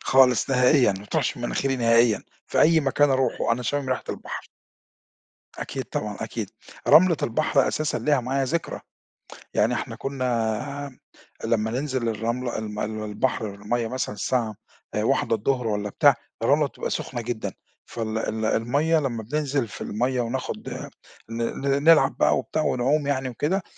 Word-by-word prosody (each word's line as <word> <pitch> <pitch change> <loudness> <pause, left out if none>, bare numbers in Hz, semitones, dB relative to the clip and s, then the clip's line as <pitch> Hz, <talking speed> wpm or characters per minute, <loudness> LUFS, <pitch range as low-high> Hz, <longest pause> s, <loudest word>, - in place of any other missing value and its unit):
خالص 130 0 +4
نهائيًا، 125 -2 +5
ما 95 +1 -8
بتروحش 145 +4 -1
من 120 - -8
مناخيري 135 +2 0
نهائيًا، 115 -2 +4 0.2
في - - +1
أي 160 +1 +6
مكان 140 +1 +3
أروحه 130 -3 +1
أنا 125 +2 -1
شامم 140 +2 -1
ريحة 130 - -1
البحر. - - -6 1.1
أكيد - - -4
طبعًا، - - -4
أكيد. - - -4 0.4
رملة 170 0 +7
البحر 135 +3 +2
أساسًا 155 -1 -1
ليها 145 -3 +2
معايا 135 +3 -1
ذكرى، 165 +5 -2 0.7
يعني - - +2
إحنا - - -3
كنا 130 +1 -2 0.5
لمّا 110 -1 +1
ننزِل 130 -2 -1
الرملة 115 +3 -2
الم 105 -1 -5
المي 110 0 -3
البحر 110 +1 -1
المَيّة 115 +3 -2
مثلًا 125 -3 -3
الساعة 115 0 -1 0.4
13:00 115 +2 +1
والّا 105 -1 -1
بتاع - - +5 0.3
الرملة - - +4
تبقى - - -5
سُخنة 120 -2 -3
جدًا 110 -4 -3 0.3
فال 110 -1 -4
ال 110 0 -2
المَيّة 140 +9 +2
لمّا 120 -6 -2
بننزل 140 0 -1
في - - -10
المّيّة 125 +4 0
وناخد 120 +2 -4 0.6
ن 115 +1 -3
ن 140 +3 -1
نلعب 155 -4 +5
بقى - - +4
وبتاع 155 - -2
ونعُوم 140 +3 +1
يعني 130 -2 0
وكده 160 - -1
125 Hz, 150 wpm, -25 LUFS, 115-140 Hz, 1.1 s, رملة